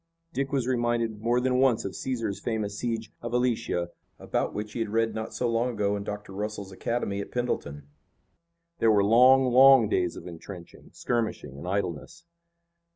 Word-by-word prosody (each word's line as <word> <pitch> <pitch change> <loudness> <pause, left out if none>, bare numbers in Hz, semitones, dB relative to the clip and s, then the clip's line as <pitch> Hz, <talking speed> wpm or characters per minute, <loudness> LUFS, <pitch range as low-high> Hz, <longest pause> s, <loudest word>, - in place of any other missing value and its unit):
Dick 135 -1 -2
was 135 -4 0
reminded 120 -3 0
more 120 +2 +2
than 125 0 +1
once 130 -4 +3
of 100 - -5
Caesar's 115 -6 -3
famous 105 -3 -3
siege 115 -2 -3
of 120 0 -5
Alesia, 115 -8 0 0.3
about - - -2
which 105 0 -5
he - - -4
had 115 - -1
read 115 +1 +1
not 110 0 -5
so 125 - -1
long 115 +1 +1
ago 105 -3 0
in 100 - -4
Dr. 105 -1 -6
Russell's 105 -1 -5
academy 100 0 -2
at - - -7
Pendleton. 75 -13 -3 0.9
There 115 - +4
were 105 -2 +4
long, 125 +5 +6
long 130 -3 +7
days 90 -5 0
of - - -9
intrenching, 85 +1 -10
skirmishing 110 - -3
and 70 +6 -8
idleness. 100 - -3
110 Hz, 170 wpm, -27 LUFS, 100-120 Hz, 0.9 s, long